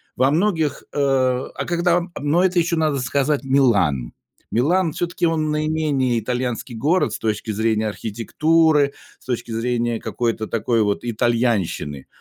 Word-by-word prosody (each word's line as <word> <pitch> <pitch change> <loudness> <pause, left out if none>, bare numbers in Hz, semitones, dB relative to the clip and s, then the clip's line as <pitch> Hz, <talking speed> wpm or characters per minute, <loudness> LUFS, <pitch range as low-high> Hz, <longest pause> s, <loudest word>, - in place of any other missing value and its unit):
во 130 +2 +3
многих, 160 -3 0
э, 145 - -2
а 130 -2 0
когда 175 0 +2 0.2
но 150 +6 +2
это 180 -1 +2
еще 170 0 +1
надо 155 -4 +1
сказать- 140 +1 0
Милан. 100 - +2 0.4
Милан, 160 +6 +2
всё-таки, 175 0 -2
он 155 -2 0
наименее 150 -5 0
итальянский 125 +1 -3
город 155 +11 +1
с - - -4
точки 110 0 -2
зрения 110 0 0
архитектуры, 145 +8 +1 0.3
с - - -24
точки 125 -2 -3
зрения 120 0 -1
какой-то 115 -2 -2
такой 115 0 0
вот 100 -1 0
итальянщины, 110 - -1
130 Hz, 140 wpm, -21 LUFS, 115-155 Hz, 0.4 s, во